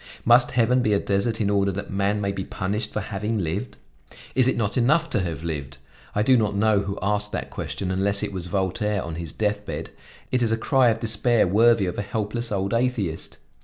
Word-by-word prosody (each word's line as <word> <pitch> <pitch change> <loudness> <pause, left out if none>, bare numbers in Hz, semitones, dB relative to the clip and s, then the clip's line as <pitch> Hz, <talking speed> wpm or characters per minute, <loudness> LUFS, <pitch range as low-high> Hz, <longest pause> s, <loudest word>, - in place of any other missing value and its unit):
Must 120 +1 +6
heaven 125 +1 +3
be 110 -3 +2
a 100 - +3
desert 100 +4 0
in 100 -2 +1
order 100 -1 +2
that 100 +2 -5
man 100 +2 0
may 100 -1 0
be 95 -1 -4
punished 105 +4 -3
for 105 - -2
having 105 +3 -3
lived? 95 +6 -3 0.6
Is 130 -1 +4
it 130 - +1
not 105 -3 -1
enough 150 +7 +2
to - - +2
have 85 -4 -3
lived? 70 -4 -4 0.4
I 105 - +2
do 130 +3 +5
not 105 -4 +1
know 105 0 +3
who 100 0 -4
asked 105 +1 -1
that - - -4
question, 95 -1 -4
unless 100 +2 +1
it 100 -1 -3
was 90 -2 -4
Voltaire 100 +2 -1
on 85 - -6
his 80 -2 -5
death 105 +2 -1
bed; - - -6 0.4
it 125 - +1
is 115 -2 +2
a 115 - +2
cry 130 +2 +3
of 110 -1 0
despair 115 +1 +2
worthy 110 +2 +4
of 90 - -3
a - - +1
helpless 110 +3 -3
old 100 0 -1
atheist. 115 -9 -1
105 Hz, 220 wpm, -24 LUFS, 100-115 Hz, 0.6 s, Must